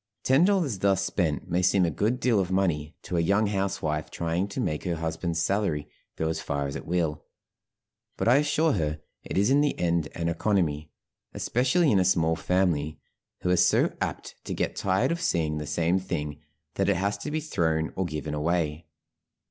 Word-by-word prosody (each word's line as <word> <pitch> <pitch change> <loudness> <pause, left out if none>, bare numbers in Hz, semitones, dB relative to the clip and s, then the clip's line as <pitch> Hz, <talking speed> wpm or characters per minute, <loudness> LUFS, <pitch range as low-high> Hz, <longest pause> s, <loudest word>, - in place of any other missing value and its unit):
Ten 135 +6 +4
dollars 175 - +1
thus 100 0 +2
spent 80 -7 -1
may 90 0 +1
seem 90 0 +3
a 85 - 0
good 110 - 0
deal 120 -4 +2
of 95 -2 0
money 85 -5 0
to 90 - -3
a - - +3
young 100 +6 +2
housewife 95 -7 -1
trying 85 +3 -1
to 100 - -6
make 75 - -1
her 90 -2 -1
husband's 80 +1 -2
salary 90 -5 0 0.3
go 80 - -1
as 80 - -2
far 70 0 -2
as 70 - -4
it - - -7
will; 80 -3 -1 0.9
but - - -1
I 125 +3 +6
assure 150 +2 +2
her 75 -4 -1 0.2
it - - -4
is 100 +6 +3
in 140 +1 +5
the 145 - +1
end 85 -2 +1
an 85 -1 -2
economy, 85 -4 0 0.5
especially 135 +6 +2
in 100 - +4
a - - +4
small 80 -3 +2
family, 80 -3 0 0.4
who 90 - +1
are - - +5
so 90 +1 +3
apt - - -3
to - - -3
get - - -1
tired 100 - +1
of 170 0 -2
seeing 80 - 0
the 75 - -5
same 85 +5 +1
thing, 75 -5 -4 0.3
that 100 0 0
it 100 - +3
has 100 +3 0
to 125 - -5
be 155 +1 -1
thrown 80 - -1
or 95 - -1
given 75 -2 -4
away. 80 0 -1
90 Hz, 195 wpm, -27 LUFS, 80-100 Hz, 0.9 s, I